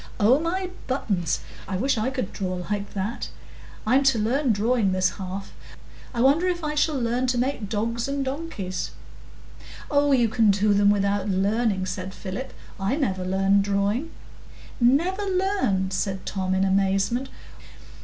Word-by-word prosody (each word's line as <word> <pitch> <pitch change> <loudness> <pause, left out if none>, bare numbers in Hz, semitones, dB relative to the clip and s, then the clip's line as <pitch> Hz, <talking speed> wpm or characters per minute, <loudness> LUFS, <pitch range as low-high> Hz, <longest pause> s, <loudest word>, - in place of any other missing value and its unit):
"Oh 230 +7 +5
my 365 +3 -2 0.2
buttons! 200 - -1 0.3
I 190 - -2
wish 265 +7 +1
I 225 +3 0
could 255 -7 -4
draw 185 -2 -3 0.2
like 205 0 -3
that. 200 +4 -3 0.6
I'm 255 +5 +4
to 270 -3 +4
learn 245 +5 +1
drawing 215 -1 +2
this 185 0 +2
half; 190 +1 -6 0.6
I 235 - -2
wonder 290 +8 +4
if 350 -2 -1
I 300 0 -1
shall 300 -1 +1
learn 245 +2 0
to 250 -1 +1
make 245 -4 -1
dogs 230 +3 -1
and 275 0 -2
donkeys!" 265 - -4 1.0
"Oh, 285 0 +3
you 245 -4 +4
can 225 -1 +3
do 205 +1 +3
them 200 0 +4
without 200 0 +1
learning," 200 +1 +1
said 185 0 -5
Philip; 205 +7 -6 0.3
"I 195 +7 0
never 195 -11 -1
learned 195 +2 +2
drawing." 200 +9 0 0.7
"Never 330 +12 +3
learned?" 370 - 0
said 190 0 -2
Tom, 185 -1 -1
in 190 - +2
amazement. 195 +6 +1
220 Hz, 155 wpm, -25 LUFS, 195-270 Hz, 1.0 s, Oh